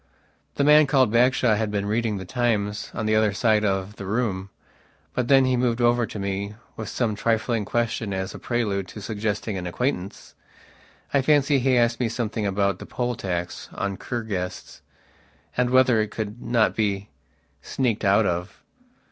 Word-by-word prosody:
The - - +1
man 150 +1 +6
called 130 -5 +3
Bagshawe 120 -1 +3
had 110 -1 -1
been 100 -1 -2
reading 110 0 0
The 95 - -6
Times 105 -2 -1
on 110 - -2
the 110 0 +2
other 110 -2 +3
side 110 0 +2
of 95 0 -1
the 100 - -7
room, 100 -3 -1 0.6
but 125 - -1
then 135 -1 +6
he 130 0 +2
moved 120 -1 +1
over 120 -1 +3
to - - -8
me 100 +1 -3 0.2
with 110 -2 -6
some 115 -4 -1
trifling 110 0 0
question 115 -2 -1
as 95 0 -3
a - - -8
prelude 105 -6 -1
to 105 - -9
suggesting 105 -1 -3
an 90 - -5
acquaintance. 100 -1 -3 0.8
I 140 - +4
fancy 145 0 +3
he 130 0 +2
asked 120 -1 +2
me 120 -3 0
something 110 -2 -2
about 100 0 0
the - - -9
poll 125 0 -2
tax 90 -5 -4
on 100 -1 -2
Kur 120 +4 -4
guests, 90 -4 -5 0.7
and 125 0 +1
whether 130 -3 +4
it 105 - -2
could 110 +2 -5
not 115 -2 +2
be 100 -2 -1 0.5
sneaked 120 -5 -1
out 100 +2 +4
of. 90 +1 -3
110 Hz, 175 wpm, -24 LUFS, 100-120 Hz, 0.8 s, man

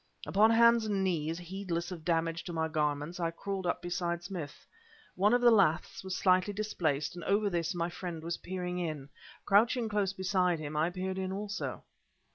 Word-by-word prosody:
Upon 215 +3 +4
hands 235 0 +5
and 200 -2 0
knees, 165 -3 -1
heedless 175 -1 -4
of 170 -3 -7
damage 165 0 0
to 175 - -5
my 160 -1 0
garments, 150 +2 -1
I 170 -1 0
crawled 190 +2 -4
up - - -1
beside 175 -1 -2
Smith. 175 -5 -7 0.5
One 200 +3 +3
of 245 0 +3
the 240 -1 +7
laths 190 -8 +2
was 190 -1 -3
slightly 185 +2 +3
displaced 160 -9 -1
and 175 -1 -8
over 205 +1 +2
this 170 0 -1
my 170 0 -1
friend 170 -3 -6
was 170 +1 -3
peering 180 0 -4
in. 155 -5 -4 0.4
Crouching 225 +3 +3
close 205 -2 +1
beside 185 -2 +1
him, 155 -1 -6
I 155 +3 +2
peered 185 +1 -3
in 190 0 -2
also. 205 +2 -4
180 Hz, 185 wpm, -31 LUFS, 165-195 Hz, 0.5 s, the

